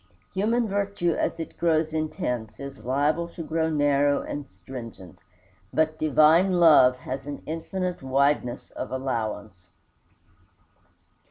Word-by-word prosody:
Human 225 +4 +1
virtue 200 -3 0
as 165 - -2
it 165 - -7
grows 160 -2 +1
intense 125 - -3
is 140 -4 -8
liable 145 +7 +1
to 165 - -5
grow 160 0 0
narrow 145 -2 +2
and 145 -1 -6
stringent; 115 -8 -10 0.5
but 155 0 0
divine 155 +5 +4
love 155 -7 +6
has 135 +2 -6
an 145 - -6
infinite 180 +3 -4
wideness 135 -1 0
of 130 - -6
allowance. 110 -8 -4
150 Hz, 115 wpm, -25 LUFS, 130-165 Hz, 0.5 s, love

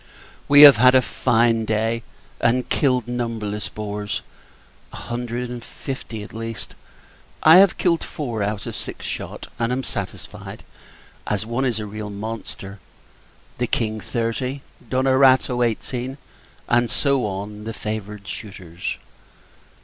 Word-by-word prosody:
We 145 +1 +9
have 145 -4 +11
had 125 +2 +6
a 130 - +7
fine 115 -1 +2
day, 110 +1 0 0.4
and 125 +1 +2
killed 125 -5 +2
numberless 115 -4 -3
boars; 105 -1 -4 0.7
a - - -10
hundred 120 0 -4
and 120 -1 -6
fifty, 115 -6 -6
at - - -11
least. 115 0 -6 0.7
I 160 +2 +9
have 195 -1 +6
killed 170 -2 +2
four, 120 -8 -4
out 100 0 -2
of - - -5
six - - -6
shot; - - -5
and 115 +1 0
am 130 +1 -1
satisfied, 100 -8 -6 0.6
as 105 +1 -1
one 120 +4 -1
is 120 -4 0
a 110 - -3
real 105 0 -6
monster 100 -1 -7 0.8
the 125 - +1
King, 110 -2 -1
thirty 120 +5 -2 0.3
D'Onerato, 130 -1 +4
eighteen, 125 +3 -2 0.5
and 120 0 +3
so 140 -5 +1
on, 105 +2 -6
the 115 - -3
favoured 105 -1 -5
shooters. 90 -5 -6
115 Hz, 135 wpm, -22 LUFS, 105-125 Hz, 0.8 s, have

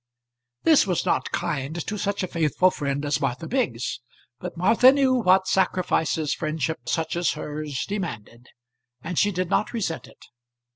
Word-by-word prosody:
This 315 -9 +5
was 180 -3 0
not - - 0
kind 140 +2 -2
to 210 - -3
such 200 -1 -2
a - - -1
faithful 170 +2 +2
friend 145 -2 -3
as 145 0 0
Martha 135 +4 -2
Biggs; 130 - -1 0.4
but 180 -1 -7
Martha 225 +8 +6
knew 270 -2 +3
what 190 -6 +3
sacrifices 165 -5 +1
friendship 155 0 -3
such 160 -1 -1
as 175 0 +1
hers 150 -2 -4
demanded, 125 - -6 0.6
and 170 0 -2
she 205 - +3
did 185 -1 -3
not 215 - +1
resent 190 -8 -3
it. - - -18
170 Hz, 155 wpm, -24 LUFS, 150-195 Hz, 0.6 s, Martha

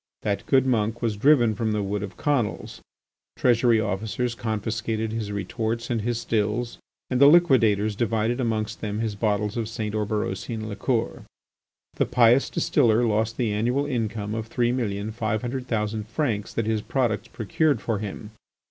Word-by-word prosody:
That 100 -1 -2
good 130 -1 +4
monk 115 -2 0
was 110 -3 0
driven 120 -1 +4
from 110 0 -1
the 105 -1 0
Wood 100 0 -2
of 100 -2 -7
Conils. 120 - -1 0.6
Treasury 120 -2 +3
officers 110 +4 -2
confiscated 110 0 -2
his 110 -2 -3
retorts 115 +4 -3
and 115 -2 0
his 120 +1 -1
stills, 115 +1 -1 0.3
and 125 +1 +1
the 140 - +9
liquidators 115 - +4
divided 115 +3 0
amongst 110 -3 -2
them 105 -1 -3
his 110 -1 -1
bottles 105 +1 -1
of 110 -2 -2
St. 110 -2 -4
Oberosian 110 +1 -2
liqueur. 115 +3 -2 0.7
The - - +1
pious 120 +1 +4
distiller 115 0 +2
lost 110 +1 0
the 115 -5 0
annual 120 +7 0
income 110 -5 -2
of 110 0 -4
three 120 +1 +1
million 110 -4 -2
five 110 -1 -2
hundred 125 +1 -4
thousand 110 -2 -2
francs 115 -5 -2
that 115 - 0
his 110 -1 0
products 110 -2 -1
procured 140 +5 0
for 110 0 -2
him. 105 +1 -6
110 Hz, 160 wpm, -25 LUFS, 105-120 Hz, 0.7 s, the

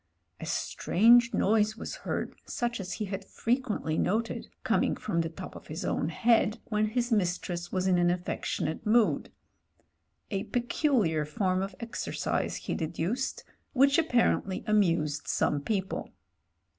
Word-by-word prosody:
A - - -6
strange 235 +5 +4
noise 215 +1 +2
was - - -6
heard - - -3
such 240 -1 -2
as 185 -2 -4
he 210 - -3
had 195 0 -5
frequently 225 - -1
noted, 225 +4 -1 0.2
coming - - +2
from 195 -6 -1
the 165 - -2
top 165 - -9
of - - -11
his 160 +5 -5
own 150 - 0
head, 220 +4 +3
when 215 -1 +2
his 240 +2 -1
mistress 175 -3 -1
was 185 -1 0
in 185 -2 +3
an 175 0 +4
affectionate 175 -2 -2
mood 220 +1 +2 0.5
— - - -46
a 200 +1 -1
peculiar 240 - +1
form 185 +5 0
of 195 0 -4
exercise 230 0 -2
he - - -4
deduced, 170 +11 -2 0.3
which 275 +3 +5
apparently 240 - +1
amused 170 -9 +1
some 145 - +1
people. 190 +2 -2
205 Hz, 145 wpm, -29 LUFS, 175-235 Hz, 0.5 s, which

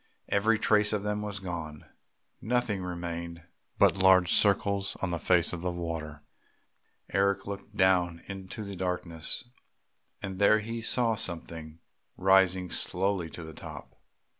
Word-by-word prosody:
Every 110 +3 +3
trace 105 -1 +3
of 105 -2 -1
them 105 0 -1
was 105 -1 -4
gone, 85 -5 -6 0.6
nothing 115 -4 0
remained 85 -1 -5 0.3
but - - +5
large 95 -2 +5
circles 100 -1 +2
on 95 - 0
the 85 - -2
face 90 0 +3
of 85 - -4
the 90 - -1
water. 80 -4 -5 0.9
Eric 100 +1 +2
looked 100 +1 -8
down 90 -2 +2
into 95 +2 -7
the 100 -1 -6
darkness, 90 -3 -1 0.8
and 95 -1 -6
there 100 +1 +6
he 115 +2 -4
saw 115 0 +2
something 85 -5 -5 0.4
rising 95 -1 +3
slowly 95 -2 -1
to 85 - -8
the 80 0 -9
top.... - - -10
95 Hz, 140 wpm, -29 LUFS, 85-100 Hz, 0.9 s, there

